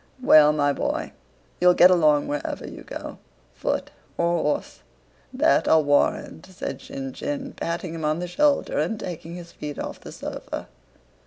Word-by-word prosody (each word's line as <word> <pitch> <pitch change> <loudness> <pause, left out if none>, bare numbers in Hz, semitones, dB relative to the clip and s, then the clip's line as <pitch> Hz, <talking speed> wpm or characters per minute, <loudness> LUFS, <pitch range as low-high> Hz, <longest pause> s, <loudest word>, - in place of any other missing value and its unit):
"Well, 150 -8 +7
my 145 -1 +1
boy, - - -2 0.5
you'll 180 0 +5
get 180 +1 +7
along 155 -5 +4
wherever 145 - -4
you - - -9
go—foot - - -6 0.3
or 170 -1 +1
horse—that 260 - -1
I'll 160 -1 +5
warrant," 145 +2 +1
said 185 -1 -6
Shinshín, 270 +1 -5
patting 170 0 -3
him 165 -1 -6
on 155 +1 +1
the 175 - -3
shoulder 285 +10 +1
and 225 -2 -1
taking 170 -2 -6
his 175 -1 -10
feet 150 -1 -7
off - - -5
the - - -9
sofa. - - -6
170 Hz, 145 wpm, -24 LUFS, 150-220 Hz, 0.5 s, Well